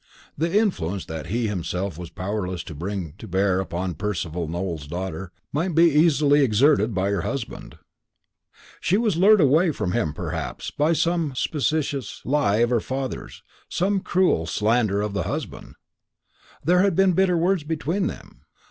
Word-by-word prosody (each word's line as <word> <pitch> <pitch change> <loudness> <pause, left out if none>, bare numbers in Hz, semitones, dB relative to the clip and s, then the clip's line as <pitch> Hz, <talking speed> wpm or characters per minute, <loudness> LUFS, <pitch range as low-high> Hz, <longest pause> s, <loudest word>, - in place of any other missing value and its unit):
The 165 +6 +1
influence 100 - 0
that 80 0 -6
he 115 +6 -1
himself 90 -1 -3
was 85 0 -8
powerless 95 -2 -3
to 80 - -8
bring 85 0 -4
to - - -9
bear 95 0 +1
upon 90 -1 -3
Percival 85 -4 -3
Nowell's 85 -3 -4
daughter 90 +2 -5 0.2
might 165 +3 -1
be 165 - +6
easily 150 -1 +4
exerted 120 -2 +3
by 95 +1 +1
her 100 -3 0
husband. 135 +5 -5 1.0
"She 190 - +2
was 220 -5 +1
lured 200 +5 +6
away 155 +5 +4
from 105 - -2
him, 75 -4 -1
perhaps, - - -4
by 150 +3 +2
some 165 -4 0
specious 145 -3 -1
lie 125 -6 +2
of 120 - -5
her 120 - +3
father's, 130 +2 -5 0.3
some 195 +2 +1
cruel 180 - +1
slander 105 +1 +1
of 105 -1 -3
the 100 - -1
husband. - - -6 0.9
There 180 +4 +4
had 195 -3 +2
been 190 0 +4
bitter 180 0 +3
words 175 0 +1
between 165 +5 -1
them. - - -9
120 Hz, 155 wpm, -24 LUFS, -, 1.0 s, be